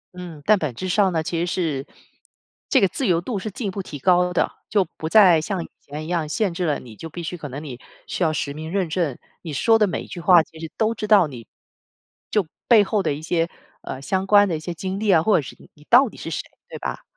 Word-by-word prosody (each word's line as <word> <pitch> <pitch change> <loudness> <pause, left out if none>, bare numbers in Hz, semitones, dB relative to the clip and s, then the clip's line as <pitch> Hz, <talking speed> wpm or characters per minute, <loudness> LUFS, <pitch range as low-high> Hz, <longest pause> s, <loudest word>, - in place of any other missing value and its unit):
嗯， 170 -5 -9
但 215 -2 +5
本 145 -6 -3
质 185 - -4
上 195 0 +3
呢， 160 -2 0
其 165 +1 -2
实 175 - 0
是 155 -6 -2 0.8
这 265 - +5
个 195 - +5
自 235 +6 -2
由 170 -2 +3
度 200 +3 -3
是 215 - -5
进 210 +1 -5
一 - - -2
步 195 - -4
提 150 -5 -8
高 180 +3 +3
的， 180 - +1 0.2
就 200 -4 +2
不 160 - -4
再 180 -7 +6
像 185 +1 -3
以 - - -14
前 150 +2 -7
一 - - -8
样 165 -3 -1
限 200 0 0
制 180 +1 -2
了 150 -3 0
你， 115 -4 -12
就 165 - -8
必 170 +2 -7
须， 180 - -4
可 150 -4 -7
能 140 +4 -7
你 130 -5 -8 0.3
需 - - -5
要 160 - +3
实 140 -2 -3
名 160 +2 -7
认 190 -3 0
证， 160 -6 -1 0.2
你 160 -4 -6
说 225 - +3
的 210 - +4
每 180 - -3
一 - - -13
句 175 - -7
话 175 -2 +6
其 160 - -16
实 160 -1 -7
都 225 0 +1
知 210 -1 -5
道 205 -4 +6
你 125 -7 -9 0.8
就 210 -5 +1 0.2
背 225 -4 +7
后 205 +1 0
的 190 - 0
一 155 - -9
些， 170 0 0 0.3
呃， 130 - -6
相 190 +6 -1
关 205 0 +6
的 170 - -1
一 - - -4
些 175 +3 -5
经 190 +3 -4
历 215 -1 -1
啊， 165 -4 +5
或 215 - +3
者 - - +3
是 130 - -10
你 - - -17
你 150 - -20
到 255 +2 +7
底 - - -16
是 - - -6
谁， - - -2 0.3
对 - - -7
吧？ - - -5
175 Hz, 295 characters per minute, -22 LUFS, 155-200 Hz, 0.8 s, 背